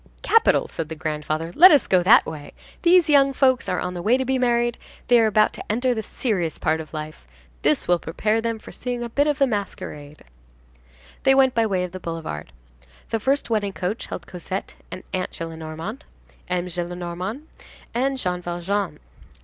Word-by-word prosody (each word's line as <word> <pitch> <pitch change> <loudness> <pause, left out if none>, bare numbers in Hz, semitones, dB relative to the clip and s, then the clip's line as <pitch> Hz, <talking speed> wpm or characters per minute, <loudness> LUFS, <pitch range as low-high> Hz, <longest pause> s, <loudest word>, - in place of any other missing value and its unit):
—"Capital," 455 - +4
said 160 -2 -5
the 160 - -5
grandfather, 155 +1 -3
"let 365 +3 +10
us 295 -5 +5
go 185 -1 +3
that 190 +6 +6
way. 150 -2 -8 0.3
These 355 -1 +5
young 275 -2 +5
folks 260 -2 +2
are 180 - 0
on 180 - -3
the 175 - -5
way 230 +7 +3
to 260 - -2
be 260 0 0
married; 240 -1 +1 0.3
they 240 -1 +7
are 225 - +4
about 215 0 +3
to - - -5
enter 245 +3 +1
the 220 - -2
serious 195 -8 -2
part 160 0 0
of 155 - -11
life. 155 - -7 0.3
This - - +1
will 175 -1 +3
prepare 215 +8 -1
them 230 0 -2
for - - -12
seeing 245 -1 -4
a 235 - -5
bit 285 +5 +1
of 295 -2 +1
the 275 - +4
masquerade." 165 - -5 1.0
They 270 - +4
went 265 -1 +4
by 230 -1 +2
way 185 -3 0
of 180 - -5
the 185 - -7
boulevard. 165 - -6 0.6
The 225 - 0
first 270 +1 0
wedding 205 -3 0
coach 190 +6 -3
held 170 - -6
Cosette 185 +2 -6 0.2
and 185 - -8
Aunt 185 -1 -1
Gillenormand, 165 - -6 0.5
M. 180 -1 -1
Gillenormand 175 - -4 0.5
and 265 +3 0
Jean 180 -7 -2
Valjean. 175 +3 -2
200 Hz, 190 wpm, -23 LUFS, 170-245 Hz, 1.0 s, let